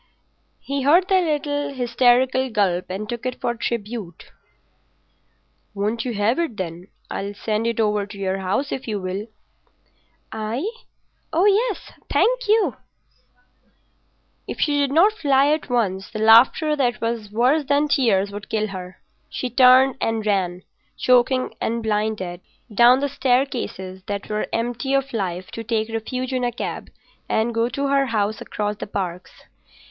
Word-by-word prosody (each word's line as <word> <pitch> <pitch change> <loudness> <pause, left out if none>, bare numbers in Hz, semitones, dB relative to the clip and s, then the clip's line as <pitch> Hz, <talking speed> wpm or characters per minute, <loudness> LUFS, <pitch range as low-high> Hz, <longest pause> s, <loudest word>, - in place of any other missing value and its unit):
He 280 0 -3
heard 335 +7 +4
the 380 -1 +4
little 290 -3 -1
hysterical 250 +1 +2
gulp 190 -5 +1
and 195 +3 -4
took 235 +1 -5
it 255 -1 -4
for 240 - -1
tribute. 225 -6 -5 1.4
"Won't 215 +4 -1
you 240 -3 -3
have 210 +8 +1
it, 320 -11 -2
then? 175 0 -5 0.2
I'll 200 +1 -4
send 215 +2 -1
it 230 -1 -2
over 210 -2 +1
to 205 0 -10
your 195 -1 -2
house 200 +10 -1
if 265 - -4
you 210 -2 -2
will." 190 +3 -4 1.0
"I? 225 - -3 0.6
Oh 345 +5 +2
yes—thank 465 +3 +1
you. 435 +1 +3
Ha! - - -23 0.6
ha!" - - -39 0.8
If - - -6
she 290 -2 +2
did 280 -1 +1
not 345 +8 +5
fly 280 -8 +3
at 310 -3 -3
once 195 -6 0
the 215 - -7
laughter 235 +8 +5
that 245 -6 0
was 230 -2 -3
worse 255 +8 +2
than 285 +2 +2
tears 210 -9 +2
would 205 +1 -8
kill 215 -1 -1
her. 185 -1 -9 0.3
She 255 - -4
turned 255 +1 +6
and 225 -1 -1
ran, 185 -3 0 0.3
choking 255 +1 +2
and 230 0 -1
blinded, 210 -5 -2 0.3
down 240 +4 +6
the 285 - +1
staircases 250 -9 -1
that 200 -2 -4
were 210 0 -2
empty 245 +4 -1
of 275 -1 -1
life 185 -4 -3
to 230 - -6
take 225 -1 -1
refuge 255 +4 -3
in 255 -1 -1
a 245 - +1
cab 235 - -5 0.4
and 225 +2 +1
go 230 +1 +1
to 280 +2 -2
her 275 -1 +2
house 215 -2 -1
across 210 0 -3
the - - -6
Parks. 185 -3 -5
230 Hz, 155 wpm, -22 LUFS, 205-270 Hz, 1.4 s, turned